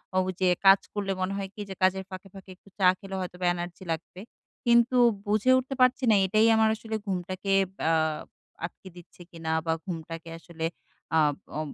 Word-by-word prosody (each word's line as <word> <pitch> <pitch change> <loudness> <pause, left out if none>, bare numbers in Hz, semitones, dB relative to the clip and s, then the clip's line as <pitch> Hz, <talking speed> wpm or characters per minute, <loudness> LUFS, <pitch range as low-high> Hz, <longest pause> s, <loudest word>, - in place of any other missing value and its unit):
অ - - +2
ওই 185 - -2
যে 185 - +4 0.2
কাজ 195 0 +8
করলে 200 -2 -2
মনে 185 +1 -1
হয় 195 -1 -4
কি? 210 - -8
যে 190 - -6
কাজের 190 +1 +3
ফাঁকে, 185 +1 -9
ফাঁকে 195 -1 -13
একটু 200 - -22
চা 190 - +3
খেলে 195 -1 -7
হয়তোবা 180 0 -5
এনার্জি 175 +1 -6
লাগবে। 165 +3 -5 0.5
কিন্তু 235 +1 +4 0.3
বুঝে 215 +5 +2
উঠতে 260 +1 -3
পারছি 255 +2 +4
না - - +6
এটাই 215 +4 +3
আমার 220 0 +4
আসলে 220 0 -6
ঘুমটাকে 185 +1 -3 0.4
আ - - +3 0.7
আটকে 190 +2 -10
দিচ্ছে 175 0 -15
কিনা? 165 -1 -6 0.2
বা 165 - +1
ঘুমটাকে 165 -2 -6
আসলে 165 -1 -9 0.5
আব 150 -2 +3 0.2
ও - - -1
190 Hz, 185 wpm, -27 LUFS, 175-210 Hz, 0.7 s, কাজ